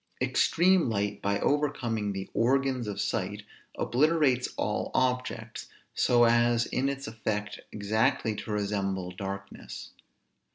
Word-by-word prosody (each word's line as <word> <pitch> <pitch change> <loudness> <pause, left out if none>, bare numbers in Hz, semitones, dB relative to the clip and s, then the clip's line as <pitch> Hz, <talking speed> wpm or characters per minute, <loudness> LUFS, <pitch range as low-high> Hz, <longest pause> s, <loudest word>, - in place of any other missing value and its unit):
Extreme 180 -4 +3
light, 100 -2 -1
by 100 0 0
overcoming 120 -8 0
the 95 -1 -5
organs 130 0 +1
of 105 - -4
sight, - - -2 0.3
obliterates 140 -2 +2
all - - -1
objects, 125 -3 -1 0.3
so 120 -1 +4
as 120 0 +4
in 135 +2 0
its 140 0 -4
effect 110 -2 -3
exactly 110 +1 +1
to - - -7
resemble 100 -3 -1
darkness. 100 +1 -7
115 Hz, 115 wpm, -28 LUFS, 105-130 Hz, 0.3 s, so